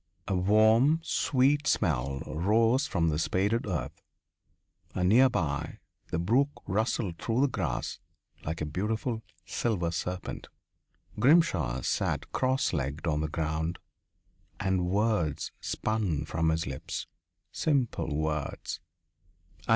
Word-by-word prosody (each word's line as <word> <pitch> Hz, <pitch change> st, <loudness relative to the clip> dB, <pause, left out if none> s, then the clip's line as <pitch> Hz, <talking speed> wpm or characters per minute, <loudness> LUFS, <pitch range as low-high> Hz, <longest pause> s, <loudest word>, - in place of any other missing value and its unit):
A 100 Hz, -, 0 dB
warm, 110 Hz, -, +4 dB
sweet 145 Hz, -1 st, +2 dB
smell 70 Hz, -, +1 dB
rose 110 Hz, -, +2 dB
from 85 Hz, -3 st, +1 dB
the 75 Hz, -1 st, 0 dB
spaded 100 Hz, +7 st, +1 dB
earth 90 Hz, -5 st, -3 dB, 0.9 s
and 90 Hz, 0 st, +2 dB
near 130 Hz, +5 st, +6 dB
by 75 Hz, -, -2 dB, 0.3 s
the -, -, -2 dB
brook 120 Hz, -, +3 dB, 0.2 s
rustled 100 Hz, -3 st, -1 dB
through 115 Hz, +9 st, 0 dB
the 140 Hz, -, +5 dB
grass 130 Hz, -, -3 dB, 0.4 s
like 80 Hz, +1 st, -4 dB
a -, -, 0 dB
beautiful 110 Hz, -, -2 dB, 0.2 s
silver 90 Hz, -8 st, -1 dB
serpent. 90 Hz, +2 st, -4 dB, 0.7 s
Grimshaw 130 Hz, -, +3 dB
sat -, -, -1 dB
cross 130 Hz, -2 st, +1 dB
legged 70 Hz, +1 st, -2 dB
on 75 Hz, -2 st, +1 dB
the 80 Hz, -, -1 dB
ground 80 Hz, +2 st, -2 dB, 0.8 s
and 95 Hz, -2 st, +1 dB
words 100 Hz, -7 st, 0 dB
spun 100 Hz, -9 st, -1 dB
from 80 Hz, +1 st, 0 dB
his 80 Hz, +1 st, 0 dB
lips 65 Hz, -1 st, -5 dB, 0.5 s
simple 125 Hz, -, 0 dB
words. 75 Hz, -2 st, -2 dB
95 Hz, 115 wpm, -29 LUFS, 80-115 Hz, 0.9 s, near